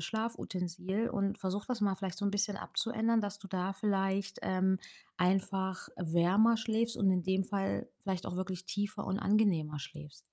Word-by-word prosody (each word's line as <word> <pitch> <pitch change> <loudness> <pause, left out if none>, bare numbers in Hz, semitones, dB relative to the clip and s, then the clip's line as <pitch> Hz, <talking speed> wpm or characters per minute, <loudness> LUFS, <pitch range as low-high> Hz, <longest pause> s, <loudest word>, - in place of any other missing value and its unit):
Schlafutensil 195 -2 -2
und 200 0 0
versuch 195 +2 -2
das 250 -3 -2
mal 200 -2 +3
vielleicht 190 0 -4
so 205 - -2
'n 200 - +3
bisschen 205 0 0
abzuändern, 230 0 +1
dass 205 -1 -3
du 200 - -10
da 185 0 -1
vielleicht, 195 -1 0
ähm, 190 0 +2 0.4
einfach 190 +1 +1
wärmer 180 +7 +4
schläfst 225 +1 0
und 195 -3 +4
in 180 -1 +2
dem 190 +2 +1
Fall 195 0 -1
vielleicht 190 -3 -2
auch - - -3
wirklich 185 -1 -3
tiefer 205 +2 -2
und 190 +1 0
angenehmer 175 -8 +2
schläfst. 150 0 -9
195 Hz, 170 wpm, -33 LUFS, 185-205 Hz, 0.4 s, wärmer